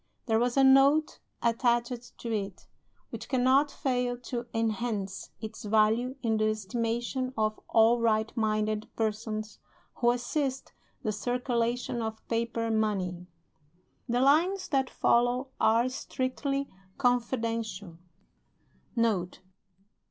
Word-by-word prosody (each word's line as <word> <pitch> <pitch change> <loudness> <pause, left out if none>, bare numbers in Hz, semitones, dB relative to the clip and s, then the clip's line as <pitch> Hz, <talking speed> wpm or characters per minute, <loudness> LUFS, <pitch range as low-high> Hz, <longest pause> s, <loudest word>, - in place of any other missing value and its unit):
There 225 -2 +2
was 245 +2 0
a 270 - +6
Note 275 +3 +5 0.2
attached 240 +1 0
to 230 -1 -4
it, 195 -3 -4 0.5
which - - -7
cannot 265 +2 +3
fail 250 -4 -1
to 240 0 -5
enhance 220 -3 -2
its 220 0 -7
value 220 +4 +2
in 225 -2 +1
the 215 0 +2
estimation 235 +5 -2
of 215 0 0
all 230 +1 +4
right 220 -1 +1
minded 215 -1 0
persons 215 -1 -3 0.4
who 240 - +3
assist 260 +2 -1 0.3
the 215 - 0
circulation 240 +1 -1
of 220 0 -5
paper 230 0 -1
money. 190 -5 -1 0.8
The 245 +1 +2
lines 345 +8 +3
that 270 -3 +1
follow 245 +2 +2
are 230 +3 +4
strictly 275 +2 -2 0.3
confidential: 230 -7 -1 1.0
"Note. 210 -7 0
235 Hz, 110 wpm, -29 LUFS, 220-255 Hz, 1.0 s, a